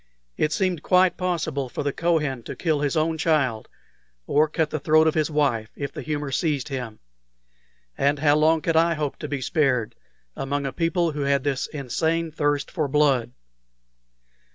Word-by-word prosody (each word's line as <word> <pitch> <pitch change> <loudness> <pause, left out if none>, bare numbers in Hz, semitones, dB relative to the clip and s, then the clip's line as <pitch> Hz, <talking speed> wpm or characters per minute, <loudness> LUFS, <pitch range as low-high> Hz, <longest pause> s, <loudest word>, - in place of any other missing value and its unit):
It 150 - 0
seemed 185 -4 0
quite 185 +1 +3
possible 160 -7 -2
for - - -4
the 140 -1 -1
Kohen 150 -7 0
to - - -6
kill 160 -4 0
his 145 +2 0
own 160 +1 0
child, 140 -9 +1 0.6
or 150 - +3
cut 155 0 -1
the 155 - -2
throat 155 +2 +4
of 160 - +3
his 155 -1 +1
wife, 135 -8 0
if 140 -1 -4
the - - -7
humor 145 -2 -3
seized 150 -2 -1
him. 125 -5 -5 1.0
And 140 +1 +2
how 145 0 +3
long 160 +1 +3
could 165 - 0
I 165 +1 +4
hope 150 -2 -3
to 150 - -6
be 145 -2 -3
spared 125 -6 +1 0.4
among 140 +1 -2
a 135 - -3
people 170 0 0
who 150 -1 -4
had 140 -1 +1
this 140 -2 -1
insane 160 +4 -2
thirst 145 -1 -1
for 155 -4 -1
blood? 135 -4 +2
150 Hz, 175 wpm, -24 LUFS, 140-160 Hz, 1.0 s, throat